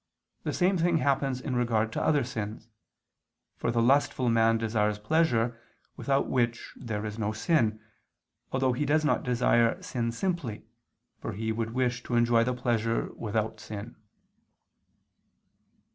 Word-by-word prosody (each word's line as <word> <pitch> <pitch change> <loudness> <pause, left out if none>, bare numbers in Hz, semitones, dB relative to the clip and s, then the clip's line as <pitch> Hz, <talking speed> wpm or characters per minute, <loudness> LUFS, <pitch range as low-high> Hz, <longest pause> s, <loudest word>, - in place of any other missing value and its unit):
The - - -2
same 185 0 +2
thing 170 0 +3
happens 135 -3 +1
in 130 -1 -3
regard 115 -2 +1
to - - -2
other 150 -3 +3
sins; 110 -2 -5 0.9
for - - -2
the 115 0 +2
lustful 130 -1 +3
man 115 0 +4
desires 105 -2 0
pleasure, 120 -2 +1 0.4
without 140 0 +1
which 120 -2 -1
there 110 -4 -4
is 105 +1 -5
no 105 0 -1
sin, 110 -3 +1 0.7
although 130 -1 +1
he 125 - -1
does 155 +2 +2
not - - +2
desire 120 -1 +2
sin 115 -2 -2
simply, 135 - -3 0.5
for - - -5
he 110 +2 -2
would 115 +1 -3
wish 125 -1 0
to 120 - -2
enjoy 120 -1 +4
the 125 +1 -1
pleasure 115 -2 0
without 110 0 -2
sin. 110 +2 -8
120 Hz, 145 wpm, -28 LUFS, 110-130 Hz, 0.9 s, man